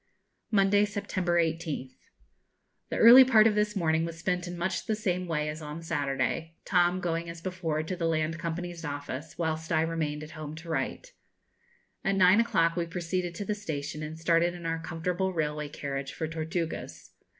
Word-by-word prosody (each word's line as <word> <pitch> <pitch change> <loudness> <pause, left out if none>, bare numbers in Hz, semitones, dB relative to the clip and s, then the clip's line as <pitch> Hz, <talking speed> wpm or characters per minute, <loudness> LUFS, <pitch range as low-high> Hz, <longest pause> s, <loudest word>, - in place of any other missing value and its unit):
Monday, 205 -1 +4
September 195 -4 -1
18th. 160 -5 -2 1.0
The - - -2
early 240 +3 +10
part 225 -4 +6
of 225 - +5
this 210 0 +1
morning 160 -3 +2
was 165 0 -4
spent 180 +1 -1
in 175 0 -6
much 170 +3 -2
the 220 - +1
same 185 -4 -1
way 150 -2 -1
as 155 +1 -5
on 150 +2 -7
Saturday, 160 +2 -1
Tom 180 -1 +3
going 170 -1 -2
as 165 0 -7
before 165 -3 -2
to 170 +4 -3
the 170 -2 -1
Land 160 0 0
Company's 170 +1 -4
Office, 145 0 -5
whilst 160 -1 -2
I - - +3
remained 155 -2 -2
at 155 - -10
home 155 -1 -7
to 165 +1 -10
write. - - -3 0.9
At 195 0 +1
nine 190 +2 +6
o'clock 165 -7 +2
we 170 -1 -1
proceeded 175 0 -3
to 200 - -4
the 210 - 0
station, 155 -7 -5
and 155 +1 -6
started 170 +1 +2
in 175 -1 -9
our 165 0 -1
comfortable 175 +4 -2
railway 150 -2 -2
carriage 140 -1 -4
for 160 - -3
Tortugas. 165 +1 -4
165 Hz, 180 wpm, -29 LUFS, 155-180 Hz, 1.0 s, early